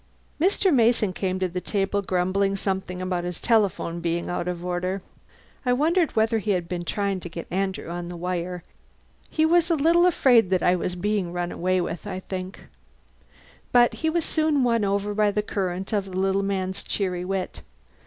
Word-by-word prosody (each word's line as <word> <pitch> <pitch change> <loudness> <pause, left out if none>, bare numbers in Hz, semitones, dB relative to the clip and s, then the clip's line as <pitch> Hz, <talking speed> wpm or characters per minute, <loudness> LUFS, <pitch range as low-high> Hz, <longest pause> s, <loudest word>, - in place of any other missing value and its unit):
Mr. 375 +1 +3
Mason 230 -5 +3
came 185 0 -2
to 185 0 0
the 180 +1 -4
table 200 0 0
grumbling 190 +1 +1
something 190 -2 -3
about 180 -1 -1
his 175 -1 -4
telephone 200 -7 +1
being 170 +1 -2
out 175 0 -2
of 175 -1 -4
order 180 +2 -2 0.6
(I 250 -2 +2
wondered 325 +5 +2
whether 220 0 +2
he 215 - -5
had 170 -1 -6
been 175 -1 -4
trying 200 0 -1
to 175 - -8
get 170 0 -7
Andrew 190 +1 -2
on 175 +1 -5
the 175 - -7
wire; 180 0 -3 0.7
he 315 - +2
was 340 +1 +3
a 335 - +3
little 335 +4 +4
afraid 245 - +4
that 185 -2 +1
I 180 - +4
was 180 0 -2
being 195 -1 -1
run 175 0 -3
away 185 +1 0
with, 170 -1 -5
I 185 - -4
think) 185 0 -6 1.1
but 240 -1 +5
he 320 - -1
was 335 0 0
soon 310 -4 +2
won 230 -3 +2
over 200 +1 0
by 210 0 +3
the 210 +1 0
current 190 -1 -3
of 200 -2 +1
the 185 -1 -6
little 195 +1 +2
man's 190 -1 -2
cheery 180 -3 -2
wit. 190 0 -3
190 Hz, 190 wpm, -25 LUFS, 180-220 Hz, 1.1 s, but